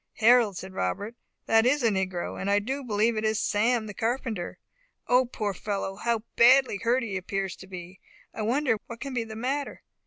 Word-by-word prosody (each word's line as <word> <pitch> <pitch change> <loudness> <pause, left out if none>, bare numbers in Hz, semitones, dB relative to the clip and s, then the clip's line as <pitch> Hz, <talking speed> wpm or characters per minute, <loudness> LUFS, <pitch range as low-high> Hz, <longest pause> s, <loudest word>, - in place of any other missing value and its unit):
"Harold," 225 -3 +4
said 190 +1 -8
Robert, 185 - -2 0.3
"that 225 0 +4
is 260 +3 +2
a 230 - +5
negro, 190 -3 -2
and 195 - -2
I 200 - +4
do 265 +7 -2
believe 220 0 +1
it 215 - -2
is 220 0 +1
Sam, 225 +2 +1
the 210 - -7
carpenter. 225 -4 -2 0.5
O 250 +1 +4
poor 210 -4 -3
fellow! 195 0 -3
how 230 +1 -1
badly 255 -1 +6
hurt 240 +5 +1
he 205 -4 -3
appears 190 0 -3
to 190 - -12
be. 185 0 -9 0.3
I - - -5
wonder 245 +2 +1
what 230 -1 -8
can 275 +1 -5
be 235 -2 -1
the 220 -1 -8
matter!" 270 +5 -3
220 Hz, 195 wpm, -27 LUFS, 195-245 Hz, 0.5 s, badly